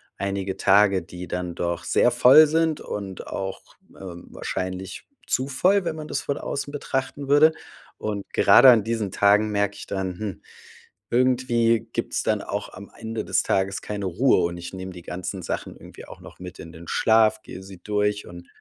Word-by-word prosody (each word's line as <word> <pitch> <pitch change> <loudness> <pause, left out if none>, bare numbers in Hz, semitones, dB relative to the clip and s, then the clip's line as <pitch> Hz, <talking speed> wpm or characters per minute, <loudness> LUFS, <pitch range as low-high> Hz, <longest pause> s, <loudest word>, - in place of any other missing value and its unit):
einige 100 -1 -3
Tage, 100 -1 +4
die 90 0 -9
dann 90 -1 -4
doch 85 -1 -3
sehr - - +3
voll 155 +5 +7
sind 160 0 +1
und 100 -2 -7
auch, 95 -1 -6 0.2
äh, - - -16
wahrscheinlich 95 +1 -6 0.2
zu 130 +2 0
voll, 185 +9 +2
wenn 165 -2 -3
man 155 -1 -7
das 140 - -3
von 140 - -3
außen 145 +1 -4
betrachten 140 0 -4
würde. 145 +3 +6 0.5
Und 105 -2 -4
gerade 135 - +7
an 115 -4 +6
diesen 110 -4 -2
Tagen 105 +2 +3
merke 100 0 0
ich - - -10
dann, 95 -2 -3
hm, 105 -4 -6 0.7
irgendwie 120 -2 +2
gibt's - - -2
dann - - 0
auch - - -5
am 100 +2 -11
Ende 115 0 -5
des - - +1
Tages 95 0 -1
keine 105 -1 -5
Ruhe 95 +9 +2
und 85 0 -2
ich 85 +2 -8
nehme 95 0 -7
die 90 -1 -11
ganzen 90 +2 -6
Sachen - - -5
irgendwie - - -13
auch - - -12
noch - - -14
mit 90 0 -10
in 85 +1 -10
den 80 +1 -12
Schlaf, 110 -1 +3
gehe 95 - -10
sie 95 -2 -12
durch 105 0 -1
und 85 0 -11
100 Hz, 185 wpm, -24 LUFS, 95-125 Hz, 0.7 s, voll